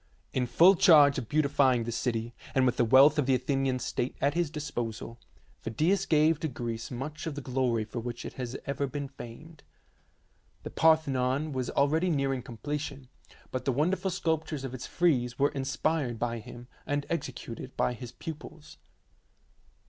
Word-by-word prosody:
In 125 -1 0
full 170 +10 +6
charge 155 -6 +6
of 115 - -8
beautifying 140 -5 +3
the 120 - -4
city, 115 0 -2 0.2
and 130 -1 +4
with 125 - +1
the - - +4
wealth 135 +6 +6
of 140 - +1
the 135 - +4
Athenian 135 0 0
state 125 0 -3
at 140 +1 +2
his 170 -2 0
disposal, 120 -7 -5 0.4
Phidias 165 - 0
gave 155 0 +3
to 160 - -1
Greece 115 -3 -5
much 150 +5 -5
of 155 - -4
the - - -4
glory 125 -4 0
for 110 +2 -6
which 120 0 -6
it - - -6
has 125 0 -5
ever 140 0 -1
been 140 +1 -4
famed. 140 +5 -11 1.0
The - - -6
Par 160 0 +5
thenon 135 0 -1
was 130 -3 -2
already 155 +6 +2
nearing 135 -4 0
completion, 140 +2 -5 0.4
but 130 -1 -4
the 135 - +2
wonderful 175 +9 0
sculptures 160 -5 -2
of 130 -2 -5
its 130 - -6
frieze 125 -9 +1
were 140 +1 +3
inspired 135 -1 -1
by 115 0 -2
him, 120 +2 -11 0.2
and 145 0 -1
executed 130 -5 -5
by 125 - +1
his 125 0 -8
pupils. 155 -1 -9
135 Hz, 170 wpm, -29 LUFS, 125-150 Hz, 1.0 s, full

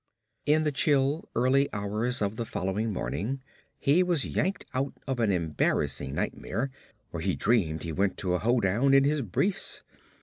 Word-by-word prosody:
In 155 +1 +4
the 150 - +1
chill, 140 +2 +1
early 130 +4 +3
hours 105 +4 -1
of 100 +1 -1
the 115 - -2
following 105 +1 -2
morning 100 - -3 0.3
he 145 +6 +3
was 175 -5 +1
yanked 190 +4 -1
out 135 +1 -1
of 135 -2 -2
an 110 -3 +3
embarrassing 75 -5 0
nightmare 120 +8 -2 0.4
where 85 - -4
he 95 +1 0
dreamed 85 -9 +1
he 85 - -3
went 95 +4 0
to 90 -2 0
a 90 - +1
hoedown 120 +3 +3
in 135 - +6
his 145 +1 +2
briefs. 180 - -1
115 Hz, 165 wpm, -28 LUFS, 95-140 Hz, 0.4 s, in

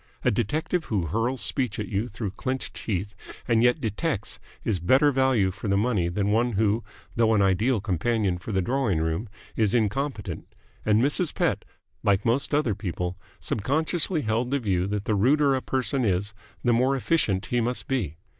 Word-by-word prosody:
A - - +3
detective 155 - -1
who 100 -6 -1
hurls 115 - -1
speech 125 -6 0
at 105 - -3
you 100 +4 -1
through 105 -3 -5
clenched 130 +6 -3
teeth 100 -1 -3 0.3
and 115 -1 +3
yet 125 +1 +4
detects 110 - -2 0.2
is 100 -5 0
better 130 - +4
value 130 -8 +2
for 100 +3 -7
the 100 0 +2
money 105 -6 +1
than 100 +3 0
one 120 +2 +2
who, 110 +2 +1 0.3
though 115 -1 +3
an 100 - +4
ideal 105 +6 +2
companion 100 0 0
for 110 - -7
the 95 -2 +1
drawing 120 -6 0
room, 80 +7 -2 0.3
is 110 0 +2
incompetent: 110 - -1 0.4
and 110 +2 +3
Mrs. 145 +4 +1
Pett, - - 0 0.4
like 100 0 +2
most 120 +4 +1
other 145 -7 +2
people, 90 -3 -3 0.2
subconsciously 155 - 0
held 115 +3 0
the 140 - +1
view 95 -7 0
that 105 0 -3
the 110 - +1
ruder 135 +7 +3
a 130 - 0
person 130 0 0
is 100 0 0 0.3
the 120 - +3
more 130 +4 +3
efficient 115 - +1
he 120 -1 0
must 120 +2 -2
be. 100 - -2
110 Hz, 180 wpm, -26 LUFS, 100-130 Hz, 0.4 s, yet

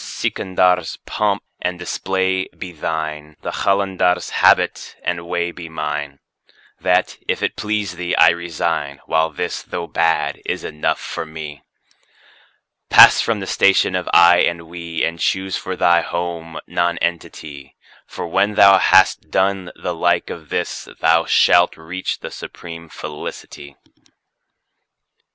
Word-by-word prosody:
Sikandar's3 90 -2 0
pomp 105 -1 -1 0.2
and 90 0 -2
display 95 +1 -1
be 95 - -7
thine, 75 -1 -5
the - - -3
Qalandar's4 95 -3 0
habit - - +2
and 85 -1 -3
way 85 0 -1
be 85 -1 -9
mine; 75 -3 -4 0.6
That, 90 +1 +1
if - - -1
it - - -1
please 105 -4 -3
thee, 90 0 -2
I - - +7
resign, 85 -5 -2
while 80 0 +1
this, - - -4
though 85 - -5
bad, 85 -1 0
is - - -3
enough 75 - -2
for - - -5
me. 80 -2 -8 1.3
Pass - - +8
from 110 -3 -1
the - - -4
station 95 -1 +3
of 90 -1 -3
"I" 85 0 +7
and 85 -1 +1
"We," 85 0 -5
and 85 0 -4
choose 95 +2 -1
for 95 - -4
thy 85 -1 +3
home 85 -1 -5
Nonentity, 85 -4 -3 0.3
For - - -6
when 105 +1 +1
thou 100 -1 +7
has 95 0 +5
done 95 -2 -1
the 90 - -4
like 80 - 0
of 80 -4 -9
this, - - -3
thou 80 +1 +3
shalt 90 +1 +4
reach 90 +4 -5
the - - -7
supreme 85 -1 -9
Felicity. 75 -2 -8
85 Hz, 135 wpm, -19 LUFS, 80-95 Hz, 1.3 s, Pass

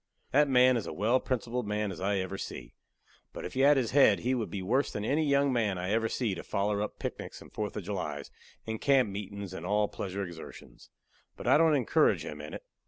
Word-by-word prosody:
That 145 +1 +4
man 125 -1 +5
is 115 - -4
a - - -5
well 115 +6 +2
principled 125 -2 -2
man 105 -1 -1
as 90 - -8
I 100 +2 +1
ever 95 +1 -3
see, - - -7 0.6
but - - -6
if - - -6
he 130 - -3
had 140 +1 +6
his 125 -4 0
head 130 -8 +5
he 125 +2 0
would 120 -4 -2
be 95 -2 -5
worse 130 +9 +1
than 105 - -4
any 150 +6 +1
young 140 -2 +2
man 110 -6 +1
I 90 +2 -3
ever 115 +1 +1
see 115 -6 -1
to 90 - -5
foller 100 +1 -1
up 105 - -4
picnics - - -6
and - - -15
4th 105 -1 -3
of 105 - -4
Julys 85 -7 -4 0.3
and 110 -1 -4
camp 135 -6 +4
meetin's 100 -1 -6
and 85 - -7
all 105 +3 +1
pleasure 100 0 -4
exertions. 85 -2 -11 0.5
But - - -8
I - - +5
don't 160 -2 +5
encourage 130 -5 +2
him 75 0 -7
in 75 - -7
it. - - -8
105 Hz, 235 wpm, -30 LUFS, 95-130 Hz, 0.6 s, had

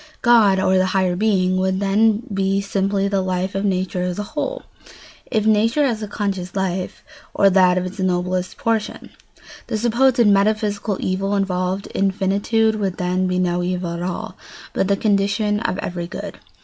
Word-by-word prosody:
God, 225 -6 +5
or 190 0 +3
the 185 - +2
highest 185 -1 +1
being, 185 -4 +2
would 190 0 0
then 210 +3 +2
be 195 0 +1
simply 200 0 -1
the 195 -1 0
life 185 0 -2
of 195 +1 -2
nature 185 -2 -1
as 180 0 -2
a 210 - -2
whole, 405 +12 -3 0.7
if 215 -3 0
nature 225 +7 +3
has 230 -5 -1
a 210 - -4
conscious 195 -3 -4
life, 190 -1 -3 0.3
or 195 -1 +4
that 185 -1 +4
of 180 - -1
its 185 +3 -8
noblest 185 0 -1
portion. 225 -2 -2 0.6
The 220 - -2
supposed 240 +3 +2
"metaphysical 205 0 +1
evil" 195 +2 -1
involved 190 0 -1
in 195 0 0
finitude 200 +4 +1
would 195 -3 -2
then 180 +1 0
be 180 0 -1
no 180 -1 0
evil 180 -1 -2
at 170 - -5
all, 180 0 -4 0.4
but 190 - 0
the 200 0 +1
condition 205 0 +1
of 205 -4 -2
every 175 -3 -4
good. - - -7
195 Hz, 175 wpm, -20 LUFS, 185-210 Hz, 0.7 s, God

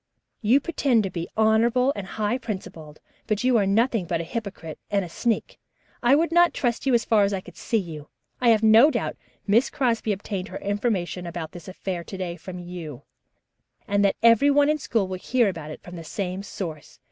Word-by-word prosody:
You 240 +5 +4
pretend 275 -7 +1
to 195 - -3
be 170 -1 -5
honorable 230 +4 +3
and 200 -2 -6
high 215 +5 -1
principled, 165 - -7 0.3
but 215 +2 0
you 255 -1 +3
are 200 -3 +2
nothing 225 0 +2
but 170 -1 -1
a - - -2
hypocrite 190 -5 -6
and 200 -2 0
a - - -7
sneak. 225 +7 -2 0.4
I 245 +3 +5
would 330 +3 +1
not 345 0 +4
trust 240 +1 -1
you 260 - +4
as 230 - +1
far 215 -2 +4
as 200 0 +1
I 195 - -1
could 180 -2 -14
see 230 - -1
you. 160 -7 -6 0.3
I 245 - +3
have 225 -1 +4
no 220 +6 +7
doubt 240 -7 -2 0.3
Miss 220 +5 +3
Crosby 235 -5 0
obtained 195 -1 -4
her - - -7
information 200 -4 -2
about 170 -2 -5
this 175 -3 -11
affair 185 -2 -5
to 190 - -7
day 180 -2 -4
from 180 0 -9
you, 175 -6 -8 0.8
and 200 0 +2
that 200 - +3
everyone 285 +5 +5
in 305 0 +1
school 225 -8 0
will 185 -1 -5
hear 240 +1 +2
it 155 -4 -7
from 180 - -10
the 165 - -7
same 185 +2 -4
source. 165 -7 -7
205 Hz, 205 wpm, -24 LUFS, 180-235 Hz, 0.8 s, no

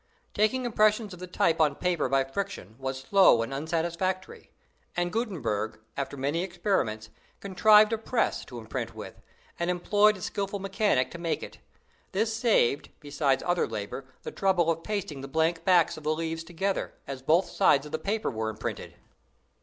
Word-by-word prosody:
Taking 215 +5 +1
impressions 215 -2 +2
of 180 - -10
the 185 - -7
type 175 -3 +1
on 150 -2 +3
paper 175 -6 0
by 135 0 +3
friction 135 - -5
was 130 0 -4
slow 135 - +5
and 115 - -5
unsatisfactory; 170 +5 -2 0.5
and 175 0 0
Gutenberg, 145 - -2 0.2
after 140 0 -4
many 145 +5 -1
experiments, 175 - -1 0.3
contrived 210 +3 +5
a 225 - 0
press 225 +1 0
to 120 - -9
imprint 110 -2 -5
with, - - -9 0.4
and 170 +1 0
employed 205 +4 +3
a - - -12
skillful 200 +1 -3
mechanic 195 -8 +1
to 170 - -8
make 170 -1 -2
it. - - -10 0.5
This 220 +3 0
saved, 220 - +2
besides 145 -2 0
other 175 0 +1
labor, 110 +4 -5 0.2
the - - -5
trouble 180 -4 +2
of 165 0 -3
pasting 175 -9 -4
the 135 - -6
blank 160 +3 0
backs 180 -5 +4
of 155 - -10
the 155 +1 +1
leaves 165 0 -3
together, 180 +4 -2
as 135 -2 -6
both 165 +7 +3
sides 140 +1 +3
of 150 - -9
the 155 - -2
paper 215 -2 -1
were 110 -2 -2
imprinted. 110 0 -6
170 Hz, 170 wpm, -28 LUFS, 140-200 Hz, 0.5 s, slow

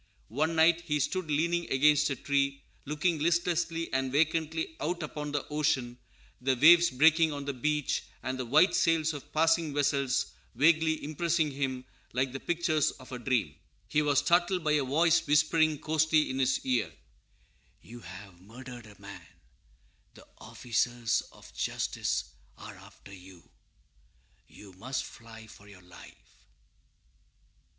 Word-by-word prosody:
One 155 +7 -1
night 165 +1 +4
he 150 -4 -2
stood 180 +3 -2
leaning 170 +3 0
against 150 +2 +3
a 135 - -2
tree, 140 0 -1 0.2
looking 155 +3 -1
listlessly 170 0 -1
and 130 0 -1
vacantly 160 +2 0
out 170 +3 -3
upon 150 -1 -5
the 145 -1 -2
ocean; 140 -5 -1 0.4
the 130 +1 +1
waves 170 +4 +7
breaking 160 +4 +4
on 140 -1 -6
the 140 - -3
beach, 150 +3 -1 0.2
and 130 0 -4
the 130 - -3
white 155 +9 +4
sails 160 -1 +2
of 145 - -10
passing 165 -1 +1
vessels 140 -2 0 0.2
vaguely 160 +3 +2
impressing 155 0 -1
him 135 -2 -3 0.3
like 130 +1 0
the 135 - -5
pictures 165 -2 0
of 130 -1 -15
a 125 - -6
dream. 120 - -1 0.4
He 150 - +2
was 145 -2 +1
startled 175 +4 +2
by 155 - +1
a 150 -2 +2
voice 160 +6 +2
whispering 155 +1 +2
hoarsely 155 -1 +1
in 130 - -4
his 130 0 0
ear, 125 -2 +1
_"You 115 - -20
have 95 -4 -12
murdered 120 +3 -11
a 105 -2 -17
man; 100 0 -11 0.9
the - - -16
officers 120 -1 -1
of - - -17
justice - - -2 0.3
are - - -10
after 100 - -15
you; 90 -2 -15 1.0
you 100 -2 -15
must 130 +8 -4
fly 115 -1 -12
for 105 -2 -16
your 95 -3 -15
life!" 90 0 -17
145 Hz, 145 wpm, -29 LUFS, 130-160 Hz, 1.0 s, waves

